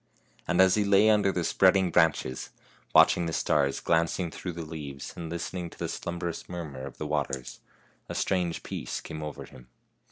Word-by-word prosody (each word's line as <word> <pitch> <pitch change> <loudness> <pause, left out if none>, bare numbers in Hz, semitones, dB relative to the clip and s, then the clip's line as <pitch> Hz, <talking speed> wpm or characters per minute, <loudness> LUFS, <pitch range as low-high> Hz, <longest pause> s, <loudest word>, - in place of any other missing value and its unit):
And 90 +1 +1
as 95 -1 +6
he 105 - +3
lay 100 +2 +5
under 105 -2 +3
the 90 -2 -1
spreading 95 +2 +4
branches, 80 -6 +1 0.4
watching 85 - +5
the 80 - -3
stars 70 -3 +1
glancing 85 +1 +1
through 90 +1 -5
the 85 -1 -6
leaves, 75 -4 -7
and 85 -1 -6
listening 85 +1 -4
to - - -16
the - - -3
slumb'rous 85 -1 -5
murmur 75 -7 -6
of 70 - -11
the 75 - -4
waters, 70 -4 -3 0.5
a - - -4
strange 90 -3 0
peace - - -4
came 80 - -7
over 75 -1 -6
him. 60 -1 -15
85 Hz, 180 wpm, -28 LUFS, 75-90 Hz, 0.5 s, as